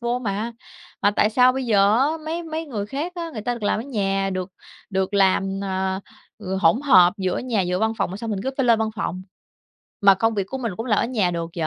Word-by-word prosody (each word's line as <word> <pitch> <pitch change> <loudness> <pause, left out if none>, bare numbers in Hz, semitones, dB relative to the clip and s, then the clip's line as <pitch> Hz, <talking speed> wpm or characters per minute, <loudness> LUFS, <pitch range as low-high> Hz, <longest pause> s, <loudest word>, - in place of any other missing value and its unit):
vô 240 +1 -1
mà. 220 0 -3 0.5
Mà 205 - +5
tại 210 +1 +2
sao 250 +3 +5
bây 265 0 -3
giờ 205 0 +4
á 270 - +4 0.2
mấy 330 +2 -3
mấy 320 0 -4
người 215 -8 -4
khác 295 +10 -4
á, 335 -1 -5
người 215 -4 -6
ta 245 +2 -1
được 235 - -10
làm 205 - +1
ở - - -4
nhà, 195 -6 -1
được 185 0 -4 0.4
được 190 +1 -1
làm, 195 0 +2
à, 190 0 -2 0.4
ừ, 190 -2 -4
hỗn 165 +10 +4
hợp 185 -11 +6
giữa 185 -3 -1
nhà 240 -5 -1
giữa 180 +1 -1
văn 220 +1 +1
phòng 195 - 0
mà 190 - -5
sao 225 +2 -6
mình 200 -3 -2
cứ 265 - -1
phải 270 - +1
lên 230 -2 +5
văn 220 0 0
phòng. 185 -2 -3 0.8
Mà 200 -2 +7
công 225 +3 +1
việc 200 -2 -1
của 265 - -5
mình 230 -5 -3
cũng 225 - -5
làm 210 -4 +2
ở - - +2
nhà 215 -8 0
được 170 -1 -4
vậy, 160 - 0
210 Hz, 255 wpm, -22 LUFS, 190-245 Hz, 0.8 s, Mà